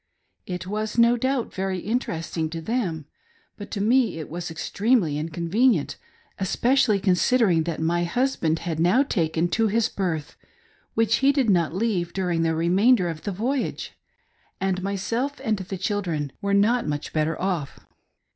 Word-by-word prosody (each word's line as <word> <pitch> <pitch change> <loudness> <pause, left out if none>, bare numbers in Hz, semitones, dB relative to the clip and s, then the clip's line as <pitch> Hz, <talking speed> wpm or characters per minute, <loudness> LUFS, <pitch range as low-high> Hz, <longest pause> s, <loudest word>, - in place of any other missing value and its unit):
It 180 0 -4
was, 215 +3 -3
no 235 +1 +5
doubt, 260 0 -1
very 190 0 -2
interesting 170 -6 -2
to 165 +1 -5
them, 170 - -2 0.5
but 205 - -9
to 205 - -4
me 235 -1 +2
it 155 -2 -7
was 175 +1 -4
extremely 195 - +1
incon 165 +3 -3
venient, 215 - +2 0.4
especially 235 +3 +2
considering 185 -2 +3
that^ 170 -2 -3
my 170 +2 0
husband 170 -5 0
had 165 -3 -2
now 180 +11 +4
taken 165 - 0
to 225 +3 +2
his 225 +2 +1
berth, 165 -6 -3 0.6
which 225 0 +3
he 275 +1 +4
did 270 -6 +2
not 170 -3 +1
leave 190 -5 -1
during 180 -3 0
the 165 -1 +1
remain 185 +10 +4
der 180 -6 -1
of 160 -2 -6
the 205 - -1
voyage, 245 +8 -2 0.7
and 190 -1 -1
myself 220 +8 -2
and 220 -1 +1
the 190 0 -5
children 175 -7 -2
were 200 0 +1
not 225 +3 +3
much 145 0 -4
better 155 +1 0
off. 180 -7 -2
190 Hz, 160 wpm, -24 LUFS, 165-230 Hz, 0.7 s, no